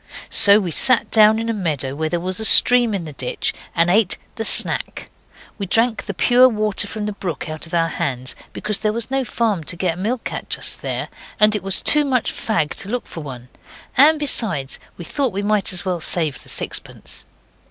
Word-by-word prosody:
So 200 +1 +6
we 185 -5 -4
sat 255 - +2
down 215 0 +5
in 225 0 -4
a 230 - -1
meadow 155 - -3
where 155 +2 -3
there 175 - -2
was 185 +2 -1
a - - -3
stream 240 0 +6
in 180 -4 -5
the 155 - -9
ditch 130 -2 -3 0.2
and 170 0 +2
ate 200 +2 +2 0.2
the 225 - -5
'snack'. - - +2 0.5
We 200 - -4
drank 225 +3 0
the 200 - -4
pure 250 +5 +4
water 210 -3 -1
from 215 0 -6
the 210 - -3
brook 175 -7 -6
out 155 +1 -6
of 165 - -6
our 165 -1 +1
hands, 135 -6 -5 0.2
because 210 -1 -3
there 215 -1 -1
was 235 +3 -4
no 270 0 0
farm 220 -8 -2
to 170 - -2
get 175 -1 -2
milk 225 +5 -4
at - - -7
just - - -4
there, - - -4 0.3
and 210 0 +4
it 210 - -3
was 190 +1 -1
too 300 0 +5
much 260 -4 -1
fag 215 -9 -2
to 200 -2 -7
look 245 +2 -4
for - - -10
one 125 -4 -10 0.5
and, 310 +4 +7
besides, 205 - +1 0.2
we 175 - -9
thought 270 - -2
we 200 +2 -4
might 210 -1 +1
as 180 0 -1
well 180 -2 -2
save 155 -4 0
the - - -11
sixpence. - - -4
200 Hz, 215 wpm, -19 LUFS, 170-225 Hz, 0.5 s, and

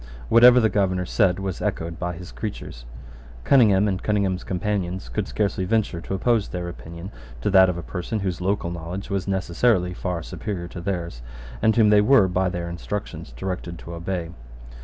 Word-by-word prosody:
Whatever 125 +1 +8
the 110 - +4
Governor 95 -4 0
said 95 -2 +2
was 95 -2 -4
echoed 85 0 -3
by 90 0 -2
his 90 +2 -10
creatures. - - -7 0.6
Cunningham 105 - +5
and 95 -2 -1
Cunningham's 100 -3 0
companions 95 - -2
could - - -2
scarcely 100 -3 -1
venture 100 -4 0
to 95 - -4
oppose 115 +1 +1
their 90 -1 -5
opinion 85 +2 -8 0.3
to 100 - 0
that 95 -1 +7
of 90 - -2
a 85 - -5
person 100 +5 -4
whose 90 -2 -2
local 95 -2 -1
knowledge 85 +4 -6
was 100 -2 -1
necessarily 95 0 +1
far 90 -2 -3
superior 90 -1 -5
to 85 - -7
theirs, 85 -9 -4 0.4
and 110 0 +3
whom 110 -3 +5
they 105 0 +6
were 115 -3 +5
by 95 0 +1
their 85 -1 -4
instructions 85 -1 -5
directed 90 -2 -5
to 85 - -9
obey. 85 0 -4
95 Hz, 180 wpm, -24 LUFS, 85-105 Hz, 0.6 s, Whatever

